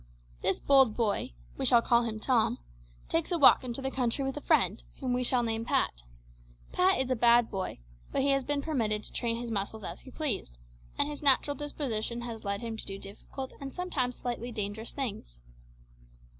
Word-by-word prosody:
This - - 0
bold 265 -5 +4
boy 210 - 0 0.2
we - - -1
shall 235 -1 +6
call 235 0 +4
him 220 -2 -3
Tom 235 0 +2 0.5
takes 165 - 0
a 350 - +3
walk 280 -3 +7
into 255 +1 -4
the 265 - -2
country 260 +1 +1
with 270 - -3
a 295 - -5
friend, 230 - +2 0.2
whom 255 -2 -1
we 250 0 0
shall 245 0 +3
name 225 -1 -1
Pat. 235 - +2 0.8
Pat 370 +1 +3
is 260 0 0
a - - +3
bad 235 0 +4
boy, 190 -2 -4 0.3
but - - 0
he 280 - +2
has 275 -1 +2
been 285 +1 -1
permitted 220 -9 -1
to - - -9
train 230 -2 -1
his 235 0 -5
muscles 210 +1 -3
as - - -6
he - - -13
pleased, 250 - -2 0.4
and - - +3
his 295 -1 -6
natural 285 0 +4
disposition 240 -6 -2
has 230 -2 -6
led 200 0 -2
him 230 -2 -5
to - - -4
do 195 0 -3
difficult 210 +7 -7
and 275 -1 -6
sometimes 270 -9 -2
slightly 245 0 -4
dangerous 215 0 -3
things. 200 - -5
240 Hz, 200 wpm, -29 LUFS, 220-270 Hz, 0.8 s, walk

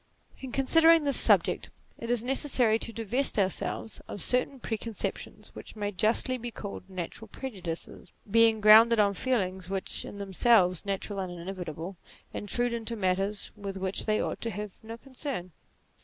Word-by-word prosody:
In 265 -2 -7
considering 325 +5 +5
this 280 -1 +3
subject - - +3 0.3
it 230 - -6
is 240 -2 +1
necessary 250 -4 +2
to 230 - -4
divest 230 +5 0
ourselves 200 +3 -1
of 205 - -3
certain 255 +2 +1
preconceptions 225 -2 -5
which - - -10
may 205 -1 -3
justly 225 +6 +1
be 240 +1 -5
called 200 -3 -8
natural 185 +4 -6
prejudices, 185 -8 -7 0.2
being 225 +1 +4
grounded 225 +2 +8
on 200 -1 +4
feelings 190 -6 -1
which, 195 -1 -3
in - - -9
themselves 195 -2 +3
natural 195 +1 -3
and 180 -2 -5
inevitable, 180 0 -6 0.4
intrude 240 +3 -2
into 230 0 -3
matters 195 +1 -1
with 200 -2 -6
which 190 +2 -3
they 215 0 +2
ought - - -3
to 230 - -2
have 210 0 -5
no 225 +1 -8
concern. 260 - -6
215 Hz, 155 wpm, -28 LUFS, 190-240 Hz, 0.4 s, grounded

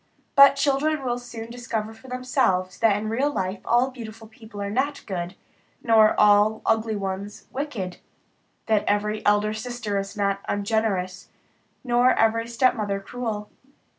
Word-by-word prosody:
But 275 0 +8
children 285 +1 +1
will 245 -1 -1
soon 235 -2 -9
discover 225 -3 -4
for 225 +4 -16
themselves 245 -8 0
that 220 -3 +4
in 215 +1 -4
real 260 +7 0
life 190 -6 -3
all 245 +3 +2
beautiful 225 -3 -10
people 220 -1 -12
are 200 0 -3
not 280 +5 -1
good, 180 -2 -4 0.5
nor 220 -2 +5
all 210 +1 +4
ugly 220 0 +1
ones 195 +1 -5
wicked; 240 -10 -4 0.7
that 215 -2 +2
every 210 +1 0
elder 210 +1 +3
sister 220 -2 -3
is 195 +2 -6
not 200 -1 0
ungenerous, 200 -3 -1 0.5
nor 245 0 +3
every 230 +1 +2
stepmother 225 -4 +1
cruel. 215 -1 -5
220 Hz, 140 wpm, -24 LUFS, 205-245 Hz, 0.7 s, But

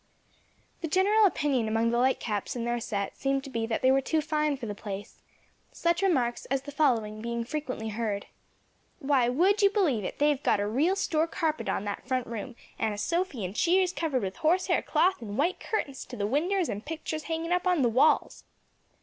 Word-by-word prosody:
The 330 - -2
general 400 +6 +4
opinion 275 - 0
among 225 +1 +1
the 235 - +1
Lightcaps 240 -5 0
and 235 -1 -3
their 240 0 0
set 200 -3 -3
seemed 275 0 -1
to 275 - -9
be 230 -2 -2
that 225 - -2
they 260 - +6
were 270 +1 +3
too 315 +4 0
fine 305 -2 0
for 255 - -6
the 210 - -4
place; 205 -1 -8 0.5
such 340 +1 0
remarks 260 -11 +1
as 270 0 -1
the 285 - -8
following 225 -8 +1
being 235 0 -2
frequently 255 -4 -4
heard, 210 -2 -2 0.7
"Why 270 -5 +2
would 375 - +3
you 400 - +6
believe 340 - +1
it, - - -5
they've 295 -1 +2
got 210 - +2
a 205 - 0
real 285 - +1
store 325 -5 +1
carpet 320 -2 -2
on 205 - -1
that 205 -1 -5
front 255 -2 0
room, 230 +1 -6 0.2
and 215 -2 0
a - - -9
sofy 335 - -1
and 185 +3 -6
cheers 365 +5 +3
covered 295 - -1
with 190 -1 -4
horse 355 +4 +2
hair - - +2
cloth 375 -4 +1
and 210 -2 -6
white 345 +7 +1
curtains 275 -11 -3
to 250 - -9
the 200 - -1
winders 340 - +1
and 205 +2 -4
picturs 315 -1 -5
hanging 325 +1 -3
up 360 +1 +1
on 360 - +4
to 280 - +2
the 240 - +4
walls." 255 +7 +2
270 Hz, 210 wpm, -28 LUFS, 230-330 Hz, 0.7 s, they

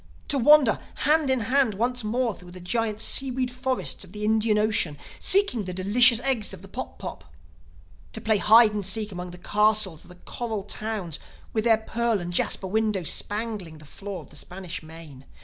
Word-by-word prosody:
To 280 - +1
wander 280 -3 +5 0.3
hand 300 -1 +3
in 260 -2 +2
hand 250 -1 +2
once 245 +3 -1
more 235 +2 0
through 180 -2 -14
the 180 +1 -11
giant 215 +3 -2
seaweed 255 -1 +1
forests 255 -2 -3
of 185 0 -15
the 210 0 -4
Indian 220 0 +2
Ocean, 210 -8 +1 0.2
seeking 380 - +3
the 180 -1 -6
delicious 230 +6 +5
eggs 255 -5 -1
of - - -16
the - - -11
pop - - -7
pop! - - -8 0.9
To - - -5
play 220 0 +1
hide 220 +1 +6
and 205 -1 -3
seek 210 +3 0
among 180 -1 -6
the 175 - -10
castles 210 -3 +1
of - - -17
the 180 - -13
coral 220 +3 -5
towns 205 -5 -4 0.3
with 220 0 -1
their 225 -2 +5
pearl 230 0 -1
and 175 0 -6
jasper 190 - 0
windows 210 -3 0
spangling 205 -6 -3
the 155 - -15
floor 195 +5 -8
of - - -18
the - - -15
Spanish 180 -1 -7
Main! 155 -4 -13
215 Hz, 190 wpm, -25 LUFS, 185-235 Hz, 0.9 s, hide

